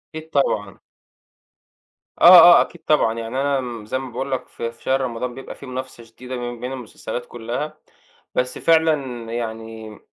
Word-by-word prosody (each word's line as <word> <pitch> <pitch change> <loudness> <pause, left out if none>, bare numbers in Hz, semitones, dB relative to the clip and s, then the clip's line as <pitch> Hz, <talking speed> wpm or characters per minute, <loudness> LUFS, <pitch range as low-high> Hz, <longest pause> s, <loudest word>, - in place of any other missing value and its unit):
أكيد 160 0 -8
طبعًا. 105 -8 0 1.4
آه، 175 +1 +11 0.2
آه، - - +6
أكيد 175 - -5
طبعًا، 150 -7 +3
يعني 115 +4 -3
أنا 140 -1 +1
م 120 -4 -7
زي 130 +5 -2
ما 135 - -7
باقول 135 +3 -4
لك 130 - -2
في 115 0 -5
في 115 - -23
شهر 135 +1 +1
رمضان 125 -1 -3
بيبقى 135 - -9
في - - -12
منافسة 130 -2 -7
شديدة 125 +3 -9
بين 120 -1 -5
بين 125 +2 -5
المسلسلات 120 -1 -6
كلّها، 120 +6 -5 0.6
بس 125 0 -1
فعلًا 150 -7 +2
يعني 110 -2 -6
125 Hz, 165 wpm, -21 LUFS, 115-135 Hz, 1.4 s, آه